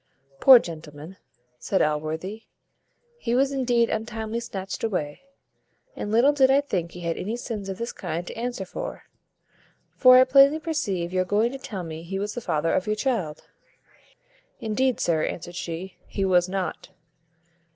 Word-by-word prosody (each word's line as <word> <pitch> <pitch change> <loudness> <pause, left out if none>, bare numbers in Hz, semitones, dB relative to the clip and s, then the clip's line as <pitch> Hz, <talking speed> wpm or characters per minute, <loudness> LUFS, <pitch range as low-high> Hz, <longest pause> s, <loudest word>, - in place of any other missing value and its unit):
"Poor 265 -2 +10
gentleman," 160 -2 -7 0.4
said 190 - 0
Allworthy, 160 +8 -2 0.7
"he 235 - -1
was 270 +2 +3
indeed 245 -4 +2
untimely 220 0 -3
snatched 195 -5 -6
away; 180 - -2 0.7
and 205 - -4
little 245 +6 +5
did 265 -2 +4
I 270 +1 +5
think 180 -12 -3
he 180 - -9
had 170 -1 -2
any 220 +5 -3
sins 215 -5 -5
of 190 - -4
this 235 +1 -4
kind 170 +3 -4
to - - -7
answer 235 -4 -4
for; - - -6 0.9
for 255 -1 +8
I 255 - +8
plainly 275 +3 +6
perceive 205 - -2
you 185 - +2
are - - +2
going 210 +6 +1
to 270 - -7
tell 200 -8 -6
me 160 -1 -7
he 180 +3 -5
was 205 +1 -3
the 240 - -5
father 160 -4 0
of 185 - 0
your 215 - +1
child." 210 - -2 1.1
"Indeed, 240 +3 0
sir," 160 -2 +1
answered 175 +1 -4
she, 175 +2 -6
"he 195 - -2
was 180 -1 +3
not." 190 -1 -4
205 Hz, 165 wpm, -25 LUFS, 175-245 Hz, 1.1 s, Poor